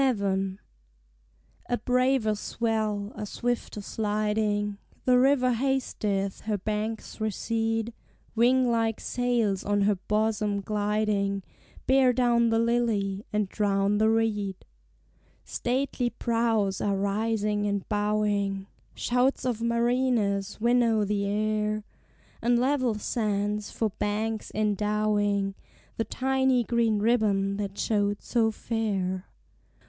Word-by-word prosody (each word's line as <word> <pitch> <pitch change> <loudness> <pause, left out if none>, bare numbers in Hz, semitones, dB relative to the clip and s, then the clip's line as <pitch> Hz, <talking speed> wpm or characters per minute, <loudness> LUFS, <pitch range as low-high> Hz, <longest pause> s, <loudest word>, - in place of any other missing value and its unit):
VII. 195 -6 0 1.1
A 245 - +1
braver 250 -3 +2
swell, 215 -1 -2
a - - -6
swifter 240 -2 -3
sliding; 210 -1 -1 0.3
The 250 -1 +5
river 255 -1 +4
hasteth, 220 -6 -1
her 215 -1 0
banks 215 +2 -4
recede; 225 +1 -1 0.4
Wing 245 +2 +3
like 225 -1 0
sails 235 -6 0
on 205 0 +1
her 205 +1 +4
bosom 210 +1 0
gliding 205 -1 0 0.4
Bear 265 -1 +4
down 235 -1 +3
the 225 - +2
lily, 225 -4 +1
and 210 -1 0
drown 200 0 +1
the 220 0 +4
reed. 210 -4 0 0.8
Stately 250 0 -1
prows 225 -5 0
are 200 -1 +1
rising 210 +1 0
and 200 -1 -2
bowing 205 -2 0 0.3
(Shouts 250 +2 +1
of 240 -3 -1
mariners 235 -4 +1
winnow 230 -2 +3
the 200 0 -1
air) 215 +1 0 0.6
And 240 +1 +3
level 255 -2 +1
sands 210 -1 -1
for 220 -2 -1
banks 215 +1 -2
endowing 210 -1 +1 0.4
The 225 - 0
tiny 265 -1 +1
green 230 -2 +1
ribbon 205 -3 +2
that 200 -1 -4
showed 205 -2 0
so 230 -2 +2
fair. 200 -5 -2
215 Hz, 110 wpm, -27 LUFS, 205-235 Hz, 1.1 s, The